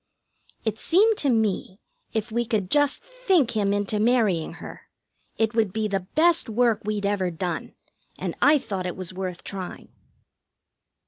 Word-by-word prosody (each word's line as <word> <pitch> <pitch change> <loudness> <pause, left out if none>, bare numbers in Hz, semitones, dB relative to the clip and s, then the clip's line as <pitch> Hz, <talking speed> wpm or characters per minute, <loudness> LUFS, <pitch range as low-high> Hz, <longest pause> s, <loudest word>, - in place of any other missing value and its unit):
It 220 0 -1
seemed 425 +6 +4
to 285 - +1
me 215 -4 0 0.3
if 220 +1 -3
we 235 +2 +1
could 215 -5 -2
just 290 +6 +3
think 470 - +1
him 205 -3 +1
into 205 +1 0
marrying 215 -8 +2
her, - - -11 0.5
it 225 0 +1
would 220 -4 +1
be 220 +2 -1
the 195 -3 -2
best 335 -3 +4
work 230 0 +2
we'd 210 -1 -2
ever 200 -2 0
done, 175 0 -4 0.4
and - - -3
I 300 +1 +6
thought 195 -8 -4
it 180 - -4
was 185 -1 -4
worth 185 -2 -5
trying. 190 -2 -7
215 Hz, 155 wpm, -25 LUFS, 190-245 Hz, 0.5 s, I